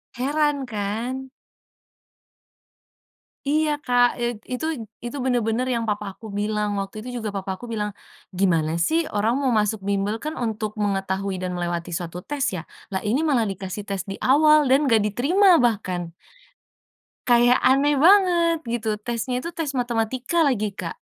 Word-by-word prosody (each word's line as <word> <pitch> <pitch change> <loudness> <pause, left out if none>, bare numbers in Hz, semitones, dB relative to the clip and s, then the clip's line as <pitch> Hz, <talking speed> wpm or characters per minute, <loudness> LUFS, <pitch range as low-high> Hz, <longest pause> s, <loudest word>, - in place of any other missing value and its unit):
Heran 285 +2 0
kan. 235 +4 -4 2.2
Iya 305 +2 +2
Kak, 245 0 +5
eee, 240 0 0 0.2
itu 250 - -3 0.4
itu 240 +4 -5
bener-bener 245 0 +1
yang 230 - -1
papa 210 0 -2
aku 225 - -14
bilang. 210 0 -1
Waktu 195 +1 -5
itu 250 - -7
juga 220 - -3
papa 195 0 -3
aku - - -8
bilang, 210 -1 -2 0.5
"Gimana 165 -5 +2 0.2
sih 325 - +2 0.2
orang 215 +3 +2
mau 265 -2 +1
masuk 210 +1 0
bimbel 200 +1 0
kan 305 +1 -3
untuk 215 -2 -2
mengetahui 195 -1 -1
dan 185 0 -2
melewati 175 0 -3
suatu 170 0 -4
tes 290 -2 -1
ya? 170 - -4 0.3
Lah 190 - -2
ini 235 +7 +2
malah 245 -7 +2
dikasih 190 +2 -6
tes 195 -1 -2
di 195 - -3
awal 300 +3 +6
dan 265 +1 +5
nggak 225 -4 +4
diterima 285 - +2
bahkan." 185 -7 -1 1.2
Kayak 240 0 +5
aneh 275 +2 +3
banget 340 -2 +4
gitu, 230 -3 -2
tesnya 245 +2 -2
itu 335 - -4
tes 320 -5 -4
matematika 245 +6 0
lagi, 215 -6 0
Kak. 195 - -6
235 Hz, 150 wpm, -23 LUFS, 205-270 Hz, 2.2 s, awal